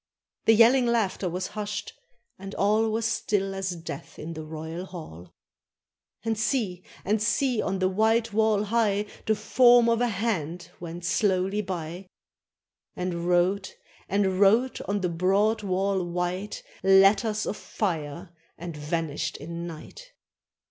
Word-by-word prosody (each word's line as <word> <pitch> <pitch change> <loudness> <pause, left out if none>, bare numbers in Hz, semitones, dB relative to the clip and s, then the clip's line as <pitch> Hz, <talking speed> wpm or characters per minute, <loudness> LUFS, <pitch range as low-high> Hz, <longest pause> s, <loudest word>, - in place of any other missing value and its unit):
The 225 - +6
yelling 240 +3 +6
laughter 205 -5 0
was 180 +2 -3
hushed, 210 -1 -4 0.5
and 195 +1 -8
all 215 +2 +2
Was 220 +1 -1
still 195 -3 0
as 190 -2 -3
death 165 0 -8
in 165 +2 -6
the 160 -1 -6
royal 160 +3 -6
hall. 90 - -10 0.9
And 225 0 +1
see! 215 -6 -1 0.2
and 210 +2 +1
see! 230 +3 +1
on 190 0 -1
the 185 0 +2
white 220 +3 +2
wall 215 -1 +3
high 210 -2 +1 0.2
The 220 - +3
form 240 +2 +5
of 230 0 +2
a 245 - +3
hand 180 -6 -2
went 170 0 -7
slowly 190 +2 +1
by. 180 -1 -5 0.9
And 175 -1 -3
wrote, 180 +2 +1 0.2
— - - -28
and 190 -2 +1
wrote, 225 +6 +4
on 200 0 -1
the 180 - +1
broad 195 +6 +2
wall 195 -1 0
white, 180 +3 -3 0.2
Letters 200 +3 +4
of - - -2
fire, 170 -4 -4 0.3
and 170 -1 -7
vanished 160 +1 -3
in 170 +3 -6
night. 485 - -11
195 Hz, 140 wpm, -26 LUFS, 175-215 Hz, 0.9 s, The